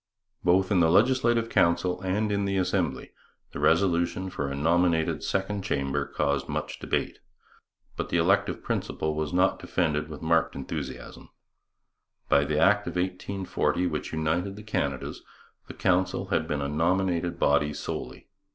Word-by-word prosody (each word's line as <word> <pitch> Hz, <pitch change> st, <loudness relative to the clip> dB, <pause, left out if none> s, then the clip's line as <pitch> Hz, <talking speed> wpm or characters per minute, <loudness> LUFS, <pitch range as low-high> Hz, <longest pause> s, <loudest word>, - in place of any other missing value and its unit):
Both 95 Hz, +3 st, +3 dB
in 95 Hz, -, +4 dB
the 80 Hz, -2 st, +4 dB
Legislative 120 Hz, +3 st, +3 dB
Council 90 Hz, -2 st, +2 dB
and 100 Hz, +3 st, 0 dB
in 100 Hz, 0 st, 0 dB
the 100 Hz, 0 st, 0 dB
Assembly 90 Hz, -7 st, -1 dB, 0.4 s
the -, -, -6 dB
resolution 90 Hz, 0 st, +2 dB
for 70 Hz, -5 st, -3 dB
a 70 Hz, -, -4 dB
nominated 85 Hz, +2 st, +1 dB
second 100 Hz, +1 st, -1 dB
chamber 70 Hz, -7 st, -1 dB
caused 70 Hz, 0 st, -1 dB
much -, -, -4 dB
debate. -, -, -2 dB, 0.8 s
But -, -, -3 dB
the -, -, +1 dB
elective -, -, +2 dB
principle 80 Hz, 0 st, -2 dB
was 75 Hz, -1 st, -2 dB
not 90 Hz, +2 st, +2 dB
defended 75 Hz, -4 st, -1 dB
with 75 Hz, 0 st, -8 dB
marked 80 Hz, 0 st, +2 dB
enthusiasm. 70 Hz, -, -6 dB, 1.0 s
By 70 Hz, 0 st, +4 dB
the 75 Hz, +1 st, -1 dB
Act 105 Hz, +5 st, +3 dB
of -, -, -4 dB
1840 90 Hz, 0 st, -1 dB
which 75 Hz, -4 st, -3 dB
united 80 Hz, +5 st, -1 dB
the 105 Hz, -, -10 dB
Canadas 70 Hz, -11 st, -3 dB, 0.5 s
the -, -, -9 dB
Council 95 Hz, 0 st, 0 dB
had -, -, 0 dB
been 70 Hz, -1 st, -2 dB
a -, -, -1 dB
nominated 85 Hz, +2 st, 0 dB
body 75 Hz, -1 st, +2 dB
solely. 75 Hz, -, -6 dB
90 Hz, 150 wpm, -27 LUFS, 75-95 Hz, 1.0 s, in